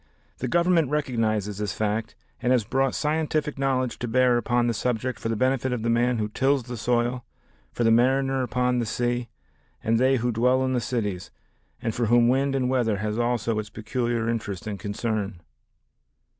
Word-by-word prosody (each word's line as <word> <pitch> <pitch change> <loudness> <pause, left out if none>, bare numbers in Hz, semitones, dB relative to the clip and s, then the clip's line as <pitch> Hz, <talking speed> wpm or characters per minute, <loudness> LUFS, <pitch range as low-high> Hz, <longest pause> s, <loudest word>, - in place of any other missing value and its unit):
The 130 - -2
Government 170 0 +3
recognizes 110 -8 -1
this 105 -2 -2
fact 110 +1 -2 0.3
and 125 - +1
has 125 -3 +3
brought 135 +4 0
scientific 150 -1 -1
knowledge 130 -2 0
to 120 - -3
bear 125 +1 +3
upon 120 +1 +1
the 120 - +1
subject 125 +2 -2
for 115 - -3
the 115 - 0
benefit 130 +2 +1
of 120 -3 -2
the 115 - +1
man 120 +1 +2
who 105 -1 -1
tills 135 +4 +1
the 120 +1 -6
soil, 120 +2 0 0.5
for 120 - -2
the 115 - +4
mariner 135 +3 +3
upon 125 +1 0
the 115 - -1
sea 120 +1 -1 0.5
and 115 +1 +2
they 130 +1 +4
who 120 0 0
dwell 125 +3 +2
in 130 - 0
the 125 - +1
cities, 105 -6 -3 0.5
and 115 -2 -1
for 120 0 0
whom 120 +1 +5
wind 135 +2 +1
and 130 -2 +1
weather 120 -5 +1
has 105 +2 -2
also 120 -2 0
its 105 -1 -5
peculiar 120 +1 -2
interest 105 -5 -3
and 105 -2 -4
concern. 105 -2 -3
120 Hz, 185 wpm, -25 LUFS, 110-130 Hz, 0.5 s, whom